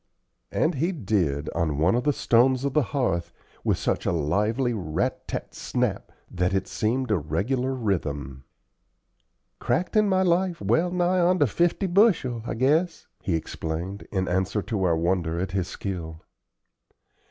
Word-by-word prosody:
And 160 Hz, -, +1 dB
he 165 Hz, +6 st, 0 dB
did, 90 Hz, -, -1 dB
on 80 Hz, -4 st, 0 dB
one 80 Hz, +5 st, +3 dB
of 120 Hz, +1 st, 0 dB
the 150 Hz, -, +4 dB
stones 130 Hz, +1 st, +3 dB
of 140 Hz, -, -1 dB
the 150 Hz, -, +4 dB
hearth, 85 Hz, -11 st, -1 dB, 0.3 s
with -, -, +1 dB
such -, -, -1 dB
a -, -, +3 dB
lively 105 Hz, -, +1 dB
rat 90 Hz, -8 st, -2 dB
tat -, -, -5 dB
snap! -, -, -2 dB, 0.2 s
that 90 Hz, +1 st, 0 dB
it 95 Hz, 0 st, -1 dB
seemed 125 Hz, +3 st, -1 dB
a 105 Hz, -, +3 dB
regular 125 Hz, -, -1 dB
rhythm. 70 Hz, -, -3 dB, 1.2 s
"Cracked 180 Hz, +5 st, -1 dB
in 215 Hz, -1 st, +4 dB
my 190 Hz, -1 st, +3 dB
life 180 Hz, -1 st, +1 dB
well 170 Hz, +3 st, +2 dB
nigh 180 Hz, +1 st, +1 dB
on 180 Hz, +1 st, +3 dB
to 145 Hz, -, +4 dB
fifty 170 Hz, -, +1 dB
bushel, 175 Hz, -, +3 dB
I -, -, -2 dB
guess," 155 Hz, +8 st, +1 dB, 0.2 s
he 90 Hz, -, 0 dB
explained, 80 Hz, +4 st, -4 dB
in 95 Hz, -2 st, -1 dB
answer 95 Hz, +3 st, 0 dB
to 105 Hz, -4 st, -2 dB
our 85 Hz, -2 st, +2 dB
wonder 85 Hz, -1 st, 0 dB
at 95 Hz, +1 st, -2 dB
his 95 Hz, -2 st, -1 dB
skill. 85 Hz, -5 st, -6 dB
110 Hz, 160 wpm, -25 LUFS, -, 1.2 s, the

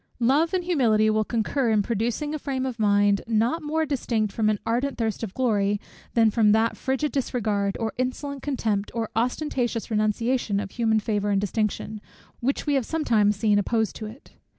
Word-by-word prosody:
Love 280 Hz, +8 st, +3 dB
and 370 Hz, -1 st, 0 dB
humility 225 Hz, -11 st, +3 dB
will 215 Hz, 0 st, +2 dB
concur 235 Hz, +3 st, 0 dB
in 215 Hz, -2 st, +3 dB
producing 235 Hz, +7 st, -2 dB
a 310 Hz, -, -3 dB
frame 265 Hz, -2 st, -2 dB
of 250 Hz, -3 st, -4 dB
mind, 205 Hz, -1 st, +3 dB
not 230 Hz, +8 st, +1 dB
more 315 Hz, +1 st, 0 dB
distinct 230 Hz, -7 st, -1 dB
from 215 Hz, -2 st, +1 dB
an 215 Hz, -, +1 dB
ardent 250 Hz, +4 st, -1 dB
thirst 225 Hz, -3 st, -2 dB
of 220 Hz, -4 st, -4 dB
glory, 205 Hz, -5 st, +1 dB, 0.4 s
than 225 Hz, -2 st, +5 dB
from 210 Hz, -2 st, +4 dB
that 225 Hz, +1 st, +2 dB
frigid 270 Hz, +3 st, -1 dB
disregard, 210 Hz, -7 st, -1 dB
or 225 Hz, -2 st, -2 dB
insolent 270 Hz, +2 st, -3 dB
contempt, 220 Hz, -8 st, -1 dB
or 225 Hz, -2 st, -2 dB
ostentatious 240 Hz, -1 st, -1 dB
renunciation 215 Hz, 0 st, 0 dB
of 200 Hz, -1 st, -5 dB
human 225 Hz, -2 st, +1 dB
favour 205 Hz, -1 st, -1 dB
and 200 Hz, -1 st, +2 dB
distinction, 210 Hz, +1 st, -2 dB, 0.4 s
which 270 Hz, +4 st, -1 dB
we 295 Hz, -, +1 dB
have 270 Hz, -2 st, +2 dB
sometimes 225 Hz, -8 st, +2 dB
seen 205 Hz, 0 st, +2 dB
opposed 220 Hz, +1 st, 0 dB
to 215 Hz, -, -6 dB
it. 225 Hz, +6 st, -13 dB
225 Hz, 180 wpm, -25 LUFS, 210-260 Hz, 0.4 s, than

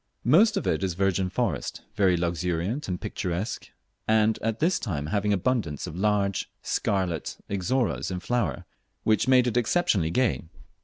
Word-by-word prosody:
Most 200 Hz, -, +5 dB
of -, -, -2 dB
it -, -, 0 dB
is 90 Hz, -3 st, -1 dB
virgin 95 Hz, 0 st, +1 dB
forest, -, -, -2 dB
very 95 Hz, -4 st, +3 dB
luxuriant 90 Hz, -, -1 dB
and 90 Hz, -2 st, -3 dB
picturesque, 95 Hz, +4 st, -4 dB, 0.4 s
and 110 Hz, 0 st, +3 dB
at 115 Hz, 0 st, -1 dB
this 170 Hz, +4 st, +2 dB
time 75 Hz, -, -3 dB
having 105 Hz, 0 st, +1 dB
abundance 100 Hz, -, 0 dB
of 80 Hz, -, -7 dB
large 100 Hz, 0 st, 0 dB
scarlet 90 Hz, -6 st, -1 dB
Ixoras 110 Hz, +5 st, 0 dB
in 90 Hz, -1 st, -3 dB
flower, 100 Hz, -, -1 dB, 0.4 s
which 110 Hz, +2 st, +2 dB
made 130 Hz, -1 st, +5 dB
it 125 Hz, -1 st, 0 dB
exceptionally 110 Hz, -, +2 dB
gay. 125 Hz, +7 st, +1 dB
100 Hz, 150 wpm, -26 LUFS, 90-120 Hz, 0.4 s, Most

